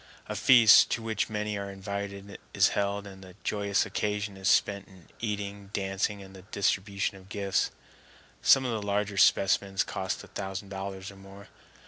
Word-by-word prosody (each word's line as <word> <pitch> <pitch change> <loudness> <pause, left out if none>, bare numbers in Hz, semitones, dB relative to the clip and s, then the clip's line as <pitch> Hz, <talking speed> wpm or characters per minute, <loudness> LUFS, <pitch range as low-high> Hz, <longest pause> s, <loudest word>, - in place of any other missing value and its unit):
A - - -4
feast, 120 -5 +7
to 115 - -3
which 110 -1 -1
many 105 -1 -3
are 100 0 -5
invited, 100 0 -6 0.2
is - - +5
held, 100 0 -1
and 95 -1 -11
the 90 -1 -13
joyous 100 -1 0
occasion 105 -1 -2
is 95 0 -4
spent 100 -2 +2
in 95 -3 -18
eating, 100 -2 -4
dancing, 100 +1 -2
and 95 0 -13
the 95 - -11
distribution 100 0 -1
of 95 0 -17
gifts. 100 -2 0 0.7
Some 135 -1 +5
of 125 - -1
the 110 -2 -2
larger 100 0 -1
specimens 95 0 +3
cost 95 -1 -4
a - - -12
thousand 95 0 -6
dollars 95 0 -6
or 100 - -15
more. 100 +1 -13
100 Hz, 170 wpm, -28 LUFS, 95-105 Hz, 0.7 s, feast